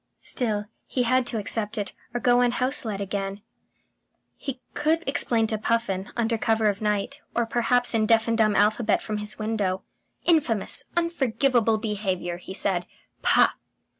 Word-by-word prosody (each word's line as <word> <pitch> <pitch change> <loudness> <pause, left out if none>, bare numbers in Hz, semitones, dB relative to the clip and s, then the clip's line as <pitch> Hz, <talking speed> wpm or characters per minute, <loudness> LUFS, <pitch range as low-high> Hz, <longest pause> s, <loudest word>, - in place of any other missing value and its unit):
Still, 215 -5 -2 0.2
he 250 - 0
had 255 +1 +2
to 230 - -2
accept 210 0 -3
it, 205 -2 -3 0.2
or 240 - -2
go 245 +1 +4
unhouseled 245 -3 +1
again. 200 0 -4 0.9
He 265 -2 -6
could 320 +3 0
explain 235 -4 +1
to 220 -1 -2
Puffin, 210 -4 -1
under 230 -1 0
cover 220 -1 +2
of 200 0 -3
night, 210 +7 -1
or 235 - +2
perhaps 245 +1 +2
in 220 -1 +2
deaf 225 0 +4
and 230 - +2
dumb 215 -2 +3
alphabet 215 +3 +3
from 215 -1 -3
his 210 0 -6
window.... 210 -4 -1 0.4
"Infamous, 270 - +2
unforgivable 260 -8 +2
behaviour!" 195 -5 -2
he 185 +2 -8
said. 180 -3 0 0.3
"Pah!" - - +5
225 Hz, 150 wpm, -25 LUFS, 205-245 Hz, 0.9 s, Pah